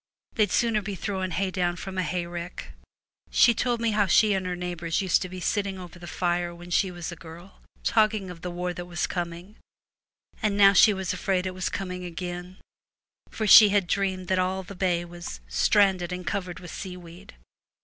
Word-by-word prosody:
They'd 210 -3 +2
sooner 230 -3 +2
be 200 0 -5
throwing 190 0 -3
hay 190 +1 -1
down 175 -2 0
from 190 +2 -7
a - - +3
hayrick/ 175 -1 -5 0.6
She 235 - +5
told 240 +1 0
me 230 -1 +1
how 205 -1 +2
she 210 +3 +4
and 190 -1 -1
her 180 - -2
neighbours 175 -2 -3
used 190 -3 +2
to 185 - -4
be 185 0 -7
sitting 195 +1 -1
over 180 -1 -10
the 175 - -10
fire 175 0 -1
when 175 +1 -12
she 190 +2 +2
was 175 -1 -6
a - - -7
girl, 170 +3 -13 0.2
talking 215 -4 +2
of 170 -2 -11
the 180 - -4
war 180 +1 -3
that 175 0 -7
was 175 -1 -2
coming, 175 +3 -5 0.8
and 205 -2 0
now 200 -1 +7
she 210 +3 +7
was 190 -3 -2
afraid 185 -1 -1
it 185 - -3
was 185 -1 -2
coming 180 -2 -5
again, 180 +1 -6 0.7
for 220 - -3
she 210 +1 +10
had 200 -2 +2
dreamed 190 0 -1
that 185 -1 +2
all 185 +1 -1
the 200 +2 -10
bay 180 -2 0
was 175 - -8
' - - -28
stranded 180 - +2
and 180 0 -5
covered 180 -3 -3
with 175 -2 -10
seaweed.' 180 - -9
185 Hz, 200 wpm, -26 LUFS, 175-195 Hz, 0.8 s, she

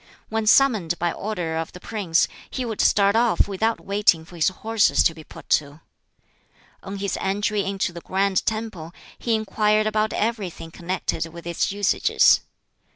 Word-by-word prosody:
When 220 0 -2
summoned 215 -10 +4
by 175 0 0
order 175 -6 -4
of 165 0 -4
the 180 - -10
prince, 190 -6 0 0.2
he 255 - -3
would 220 -3 -2
start 200 0 +3
off 230 -5 +3
without 220 +3 -1
waiting 200 -5 +2
for 175 - -14
his 165 - +2
horses 220 +3 +2
to 165 - +3
be 160 -1 -12
put - - -14
to. 145 +2 -15 1.0
On 200 +1 -7
his 200 -1 -3
entry 205 +1 0
into 195 -2 -2
the 170 - -8
Grand 190 +1 0
Temple, 215 -7 -4 0.2
he 230 -2 0
inquired 215 0 +1
about 215 0 0
everything 205 -7 -3
connected 170 -1 -3
with 170 +1 -11
its 170 +3 -1
usages. 205 0 +3
200 Hz, 160 wpm, -23 LUFS, 170-215 Hz, 1.0 s, summoned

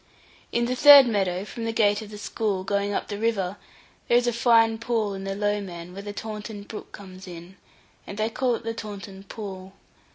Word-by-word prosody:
In 235 0 +1
the 250 +1 -1
third 285 0 +10
meadow 195 -4 0
from 230 +2 -7
the 225 - -1
gate 210 -1 +2
of 215 - -9
the 210 - -9
school, 205 -2 -2
going 200 +1 -1
up - - -2
the 205 -1 -5
river, 205 -4 -1 0.5
there 240 - +5
is 245 - +2
a 240 - +1
fine 225 -1 +4
pool 230 -4 -1
in 195 0 -6
the 195 0 -3
Lowman, 195 -4 -3
where 195 - -7
the 205 0 -6
Taunton 210 0 -7
brook 210 +1 -9
comes 190 -1 -11
in, 175 +1 -10 0.5
and 200 - -7
they 215 +1 +1
call 250 0 +1
it - - -8
the 225 0 -3
Taunton 200 -3 -8
Pool. 195 -3 -8
205 Hz, 205 wpm, -25 LUFS, 195-225 Hz, 0.5 s, third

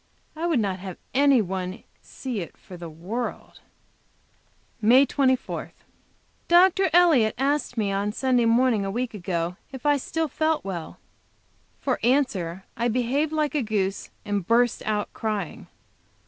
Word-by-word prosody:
I 330 +2 -2
would 320 -7 +2
not 195 -3 -1
have 185 -1 -7 0.2
any 275 -3 +5
one 185 +1 -4 0.2
see 250 -5 -5
it 170 - -7
for 185 - -12
the 170 -1 -8
world. 190 +10 -5 1.2
MAY 250 +6 +6
24. 260 -2 0 0.7
Dr. 370 +2 +5
Elliott 315 -11 +5
asked 275 -1 0
me 205 -3 0
on 200 +1 -1
Sunday 250 +1 +1
morning 230 -2 +3
a 195 - -2
week 240 +4 -2
ago 175 -3 -3
if 265 -1 -9
I 290 -1 +4
still 320 +4 -2
felt 315 0 0
well. 175 -4 -5 0.8
For 260 -3 -1
answer 205 -9 0
I 235 - 0
behaved 255 +6 0
like 305 -1 0
a 295 - +1
goose, 200 -4 -2 0.2
and 205 -3 -2
burst 240 +1 +3
out 210 -1 -1
crying. 210 -6 -4
235 Hz, 145 wpm, -25 LUFS, 195-275 Hz, 1.2 s, MAY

